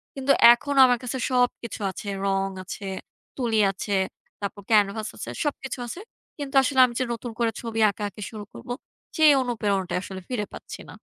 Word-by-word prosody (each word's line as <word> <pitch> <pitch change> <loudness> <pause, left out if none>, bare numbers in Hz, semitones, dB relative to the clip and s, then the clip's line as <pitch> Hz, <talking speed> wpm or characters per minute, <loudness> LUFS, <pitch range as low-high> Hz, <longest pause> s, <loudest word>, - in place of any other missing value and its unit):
কিন্তু 270 0 +1 0.2
এখন 285 +4 -3
আমার 250 -1 +3
কাছে 255 +2 -3
সবকিছু 245 -2 0
আছে, 205 - -9 0.2
রং 195 0 +1 0.2
আছে, 195 +1 -7 0.5
তুলি 230 -4 +1
আছে, 200 +1 -3 0.5
তারপর 200 0 -4
ক্যানভাস 210 0 +3
আছে, - - -6
সবকিছু 270 -3 -3
আছে। 345 - -6 0.4
কিন্তু 280 -1 -6
আসলে 265 0 +1
আমি 240 - -5
যে - - +2
নতুন 235 0 -6
করে 230 -1 +2
ছবি 230 -1 -4
আঁকাআঁকি 205 +1 -6
শুরু 215 -2 -7
করব - - -11 0.5
সেই 310 -2 +7
অনুপ্রেরণাটাই 205 -7 -1
আসলে 190 -1 -7
ফিরে 225 -5 -1
পাচ্ছি - - -9
না। - - -10
230 Hz, 170 wpm, -25 LUFS, 205-255 Hz, 0.5 s, সেই